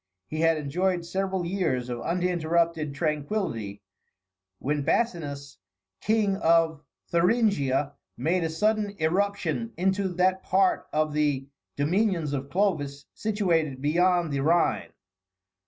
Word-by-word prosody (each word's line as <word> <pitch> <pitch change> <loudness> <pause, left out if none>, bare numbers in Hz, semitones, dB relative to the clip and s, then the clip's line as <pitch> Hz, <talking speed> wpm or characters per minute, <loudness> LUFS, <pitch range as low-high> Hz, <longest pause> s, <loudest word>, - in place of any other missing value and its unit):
He 155 - -4
had 165 0 +3
enjoyed 175 +4 -1
several 190 0 -2
years 165 -9 -1
of 120 -1 -4
uninterrupted 170 -3 0
tranquillity, 145 - -2 0.7
when 145 +6 -1
Basinus, 145 -6 -2 0.4
King 215 -2 +1
of 165 -4 +3 0.3
Thuringia, 170 - +2 0.2
made 165 +7 +1
a 165 - 0
sudden 210 +4 0
irruption 200 +7 0
into 190 +2 +1
that 185 +1 +2
part 190 0 +2
of 155 0 0
the 145 -3 +1 0.3
dominions 170 0 +1
of 140 0 -3
Clovis 145 -6 -1
situated 170 -10 0
beyond 170 +2 +2
the 140 - 0
Rhine. 150 - +2
165 Hz, 110 wpm, -26 LUFS, 145-190 Hz, 0.7 s, had